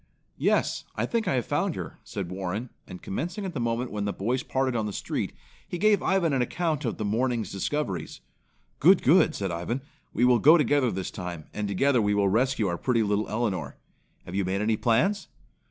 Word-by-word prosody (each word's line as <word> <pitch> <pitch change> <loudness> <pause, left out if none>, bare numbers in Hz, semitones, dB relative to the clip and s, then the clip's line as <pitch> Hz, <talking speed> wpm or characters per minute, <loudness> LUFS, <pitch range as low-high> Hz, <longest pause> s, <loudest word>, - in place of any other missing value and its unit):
"Yes, - - +1
I - - 0
think 230 -3 -1
I 135 - +2
have 120 -4 0
found - - 0
her," - - -7
said 95 -3 -5
Warren 95 +6 -4 0.2
and 90 - -10
commencing 175 - -4
at 185 - -4
the 150 - -3
moment 120 +1 -1
when 105 -1 -2
the 100 - 0
boys 120 +7 -1
parted 130 -1 -1
on 110 -2 0
the 105 - -5
street, - - -3 0.4
he 175 - -4
gave 205 +1 +3
Ivan 180 -5 +2
an 130 - +2
account 155 +2 -1
of 115 - -2
his 105 - -3
morning's 115 -1 0
discoveries. 95 - -3 0.6
"Good! 185 +6 +6
Good!" 160 +2 +5
said 95 -3 -2
Ivan. 90 +10 -3 0.3
"We 120 - +2
will 125 -1 +5
go 155 +9 +7
together 145 -3 +2
this 95 -3 -4
time, 90 -4 -6
and 105 -1 -2
together 125 +6 +2
we 105 0 +1
will 100 -1 +3
rescue 125 +2 +1
our 85 -1 -2
pretty 120 -3 +2
little 105 +1 0
Elinor. 110 -4 -2 0.5
Have 90 - -8
you 100 +1 +1
made 95 +2 -1
any 110 +1 +2
plans?" 155 - +1
115 Hz, 205 wpm, -27 LUFS, 100-140 Hz, 0.6 s, go